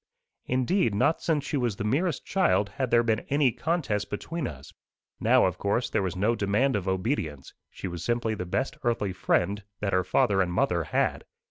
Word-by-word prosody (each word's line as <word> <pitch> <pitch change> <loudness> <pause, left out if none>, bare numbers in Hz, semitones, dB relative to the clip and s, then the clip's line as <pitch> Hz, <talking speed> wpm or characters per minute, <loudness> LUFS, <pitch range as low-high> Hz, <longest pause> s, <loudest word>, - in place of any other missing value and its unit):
Indeed, 130 - +1
not 155 +10 +2
since 155 -4 0
she 145 - -1
was 120 -5 0
the 105 - -4
merest 140 - 0
child 175 - +2
had 130 +5 -3
there 120 0 +4
been 110 -2 +1
any 140 -2 +3
contest 125 -8 -1
between 155 +8 -4
us. 70 -4 -10 0.5
Now, - - +4
of - - -1
course, 100 +5 0
there 110 - +1
was 95 -3 -2
no 105 +5 +2
demand 105 +5 +1
of 100 -2 -2
obedience: 95 - -2 0.2
she - - -7
was 85 -2 -6
simply 120 0 0
the 90 -4 -5
best 135 +10 -2
earthly 115 -6 0
friend 100 +2 0 0.2
that 100 -2 -2
her 95 0 +3
father 95 +2 +2
and 90 -2 0
mother - - +1
had. - - 0
110 Hz, 195 wpm, -27 LUFS, 95-135 Hz, 0.5 s, there